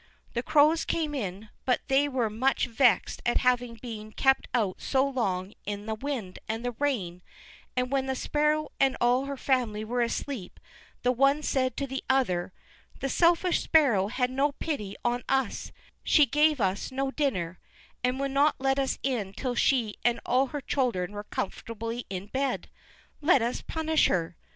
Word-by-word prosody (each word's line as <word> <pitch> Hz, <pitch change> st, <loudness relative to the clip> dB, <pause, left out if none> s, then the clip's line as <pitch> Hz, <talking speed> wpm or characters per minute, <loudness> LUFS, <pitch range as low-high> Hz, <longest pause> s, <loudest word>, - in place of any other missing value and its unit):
The 235 Hz, -, 0 dB
Crows 305 Hz, +4 st, +4 dB
came 310 Hz, -3 st, -1 dB
in, 210 Hz, -5 st, -4 dB
but 250 Hz, -, +1 dB
they 280 Hz, +2 st, +3 dB
were 255 Hz, -4 st, 0 dB
much 235 Hz, +6 st, +1 dB
vexed 245 Hz, +1 st, +2 dB
at 240 Hz, -, +2 dB
having 245 Hz, -1 st, +2 dB
been 220 Hz, -2 st, -8 dB
kept 265 Hz, +3 st, +2 dB
out 210 Hz, -7 st, 0 dB
so 270 Hz, 0 st, +2 dB
long 195 Hz, -8 st, -2 dB
in 205 Hz, 0 st, -5 dB
the 220 Hz, -, -2 dB
wind 220 Hz, -6 st, -4 dB
and 225 Hz, +2 st, -3 dB
the 245 Hz, -, 0 dB
rain, 195 Hz, -12 st, -1 dB, 0.6 s
and 250 Hz, 0 st, 0 dB
when 270 Hz, -1 st, +1 dB
the 265 Hz, -, -1 dB
Sparrow 300 Hz, +3 st, 0 dB
and 270 Hz, -1 st, +3 dB
all 245 Hz, +2 st, +3 dB
her 280 Hz, 0 st, -4 dB
family 240 Hz, -6 st, 0 dB
were 245 Hz, +2 st, -1 dB
asleep, 235 Hz, -3 st, -3 dB, 0.4 s
the 250 Hz, -, +4 dB
one 275 Hz, +4 st, +3 dB
said 255 Hz, -3 st, 0 dB
to 280 Hz, -, -1 dB
the 265 Hz, 0 st, -5 dB
other: 190 Hz, -10 st, +1 dB, 0.5 s
"This 270 Hz, -, -2 dB
selfish 345 Hz, +1 st, +3 dB
Sparrow 250 Hz, -, +4 dB
had 250 Hz, +3 st, -1 dB
no 280 Hz, +2 st, +1 dB
pity 240 Hz, -12 st, -4 dB
on 240 Hz, +1 st, 0 dB
us; 265 Hz, -5 st, 0 dB, 0.3 s
she 300 Hz, -, +5 dB
gave 300 Hz, +1 st, +3 dB
us 195 Hz, +2 st, -1 dB
no 270 Hz, +1 st, -1 dB
dinner, 185 Hz, -, -1 dB, 0.4 s
and 250 Hz, +1 st, 0 dB
would 275 Hz, 0 st, -1 dB
not 280 Hz, +2 st, +3 dB
let 270 Hz, +1 st, +1 dB
us 270 Hz, -1 st, 0 dB
in 225 Hz, -8 st, -1 dB
till 255 Hz, +2 st, -3 dB
she 240 Hz, -3 st, +1 dB
and 240 Hz, -1 st, +2 dB
all 260 Hz, +2 st, +3 dB
her 290 Hz, +2 st, -5 dB
children 240 Hz, -10 st, -1 dB
were 205 Hz, 0 st, -7 dB
comfortably 230 Hz, +4 st, -4 dB
in 190 Hz, 0 st, -4 dB
bed; 265 Hz, +4 st, -2 dB, 0.5 s
let 290 Hz, -5 st, +4 dB
us 240 Hz, +2 st, -2 dB
punish 320 Hz, -1 st, +1 dB
her." 170 Hz, -1 st, -1 dB
255 Hz, 175 wpm, -28 LUFS, 220-275 Hz, 0.6 s, she